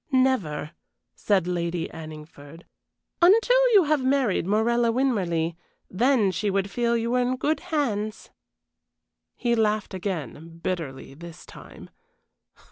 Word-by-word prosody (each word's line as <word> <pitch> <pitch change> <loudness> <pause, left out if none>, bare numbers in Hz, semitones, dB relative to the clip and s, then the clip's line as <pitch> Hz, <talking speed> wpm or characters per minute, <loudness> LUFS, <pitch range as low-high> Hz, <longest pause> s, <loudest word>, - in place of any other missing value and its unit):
"Never," 255 - +1 0.4
said 195 -4 +1
Lady 170 -1 -2
Anningford, 155 0 -11 0.6
"until 475 +7 +5
you 400 -3 +7
have 300 -3 +1
married 260 -9 +1
Morella 230 +3 +2
Winmarleigh; 185 -10 0 0.4
then 225 0 +2
she 200 +4 -2
would 195 0 -1
feel 235 -1 +1
you 230 +1 -2
were 250 0 +2
in 250 +1 0
good 295 +5 -1
hands." 235 - -3 1.0
He 240 -1 0
laughed 215 -3 0
again 165 - -6
bitterly 145 -8 -4
this 170 +3 -12
time. - - -13
210 Hz, 120 wpm, -25 LUFS, 170-255 Hz, 1.0 s, you